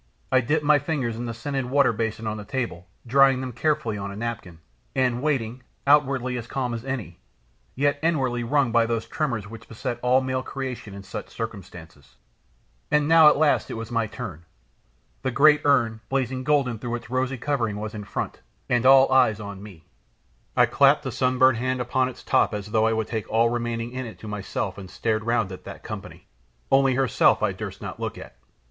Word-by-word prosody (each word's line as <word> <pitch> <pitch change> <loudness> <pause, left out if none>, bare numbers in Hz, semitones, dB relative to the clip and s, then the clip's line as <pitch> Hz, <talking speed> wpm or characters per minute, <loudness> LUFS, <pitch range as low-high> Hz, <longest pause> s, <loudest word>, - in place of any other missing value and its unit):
I 130 -1 +5
dipped 150 +6 0
my 150 0 +5
fingers 135 -6 -2
in 120 +1 -5
the 115 - -4
scented 135 +2 -3
water 135 -2 +3
basin 110 0 -3
on 110 0 -2
the 105 - -7
table, 115 -8 -4 0.2
drying 135 +1 +5
them 130 -1 -4
carefully 125 -4 -1
on 100 0 -4
a - - -8
napkin, 105 -6 -5 0.4
and 125 -2 +1
waiting, 130 -5 -1 0.2
outwardly 135 -3 +3
as 115 - -8
calm 125 -2 -2
as 115 -1 -5
any, 120 -11 -5 0.6
yet 145 +2 +1
inwardly 135 -7 0
wrung 135 0 +1
by 115 0 +3
those 115 -1 -1
tremors 120 -10 -2
which 115 +2 -11
beset 115 +1 -4
all 125 +1 +4
male 130 0 -2
creation 125 -6 -6
in 100 - -9
such 95 - -7
circumstances. 90 -10 -9 0.7
And 150 -1 +2
now 160 -1 +7
at 150 - +6
last 150 -1 +2
it - - -4
was 115 +1 -6
my 115 -2 0
turn. 100 - -7 0.8
The 130 - -1
great 150 +4 +5
urn, 115 -6 +2
blazing 130 -1 -1
golden, 135 -5 +1
through 120 +1 -3
its 120 0 -8
rosy 130 0 -1
covering, 115 -6 -1
was 110 0 -5
in 105 -1 -6
front, 100 - -4 0.3
and 125 +1 +2
all 135 0 +7
eyes 110 -5 +4
on 100 -2 -7
me. 95 -6 -12 0.7
I - - +7
clapped - - +4
a - - -2
sunburnt 130 -1 +3
hand 130 +1 -1
upon 125 +1 0
its 130 - -12
top - - +2
as 105 0 -6
though 110 0 +3
I 115 - +2
would 110 0 -1
take 110 -2 -4
all 115 +1 +3
remaining 120 -1 -3
in 130 -1 -5
it 110 - -10
to 110 - -8
myself 100 -1 -4
and 95 -2 -9
stared 110 +1 -1
round 115 -4 +1
at 95 - -9
that - - -9
company - - -8 0.5
only 135 -1 +4
her 135 - +2
herself 130 - +3
I - - +2
durst - - -7
not - - -7
look - - -4
at! - - -11
120 Hz, 205 wpm, -24 LUFS, 110-135 Hz, 0.8 s, now